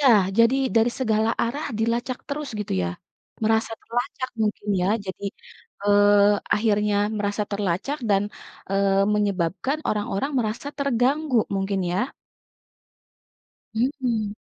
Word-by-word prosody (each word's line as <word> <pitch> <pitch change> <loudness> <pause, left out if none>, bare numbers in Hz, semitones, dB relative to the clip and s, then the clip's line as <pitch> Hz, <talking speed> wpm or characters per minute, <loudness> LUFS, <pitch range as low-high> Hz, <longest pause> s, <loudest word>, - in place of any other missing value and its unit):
ya! 285 - +3 0.3
Jadi, 230 +2 +6 0.2
dari 225 +2 +4
segala 220 -3 +2
arah 280 +7 -2
dilacak 235 +3 -1
terus 285 0 -3
gitu 210 - -4
ya? 85 - 0 0.6
Merasa 220 +1 +2
terlacak 250 +2 -3
mungkin 210 0 -2
ya, - - +1 0.2
jadi, 190 +2 -6 0.6
eee, 205 0 +5 0.4
akhirnya 210 -1 +2 0.2
merasa 205 +1 -1
terlacak 200 - -1
dan, 195 0 +4 0.5
eee, 195 0 +2 0.2
menyebabkan 200 - 0
orang-orang 210 +5 -1
merasa 225 +4 -2
terganggu 275 +1 +2 0.2
mungkin 195 0 -1
ya? 245 +9 -1 1.6
Mhm. 230 -4 -1
220 Hz, 110 wpm, -24 LUFS, 205-255 Hz, 1.6 s, Jadi